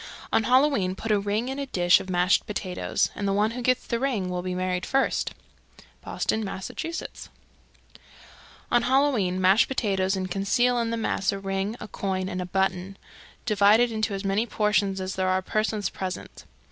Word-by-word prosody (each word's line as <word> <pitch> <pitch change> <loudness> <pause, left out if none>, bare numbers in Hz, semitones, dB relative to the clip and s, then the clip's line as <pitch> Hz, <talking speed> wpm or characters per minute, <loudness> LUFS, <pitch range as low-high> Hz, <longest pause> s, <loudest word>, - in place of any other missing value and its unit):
_ - - -11 0.3
315. - - +4
On 220 - +2
Halloween 255 -9 +3
put 225 +3 -4
a 210 - +3
ring 205 +4 -1
in 265 +2 -4
a 280 - -3
dish 175 -6 +4
of 190 - -8
mashed 180 +1 +2
potatoes, 190 -3 -1
and 200 - -3
the - - +1
one 210 +2 +2
who 250 +2 -5
gets 255 +1 +1
the 235 - -2
ring 230 -9 -1
will 180 0 -2
be 180 0 -4
married 180 0 -1
first. 270 0 0 0.7
Boston, 220 - -1
Mass. 190 -2 -5
316. 330 0 -6 1.4
On 240 - +4
Halloween 245 -8 +2
mash 190 +4 +5
potatoes 195 -7 0
and 185 -1 -4
conceal 240 +6 +2
in 230 -1 -1
the 230 - -2
mass 205 -3 0
a 195 - -4
ring, 195 +2 -2
a - - -7
coin, 190 -2 -3
and 180 0 -3
a 180 - -5
button. 190 0 -1 0.5
Divide 210 -1 +5
it 240 -1 +3
into 220 -2 -1
as 195 +1 -5
many 200 +4 +1
portions 210 -3 +1
as 190 0 -3
there 185 0 0
are 185 0 +1
persons 215 -1 -1
present. 185 -1 -6
200 Hz, 195 wpm, -26 LUFS, 185-230 Hz, 1.4 s, mash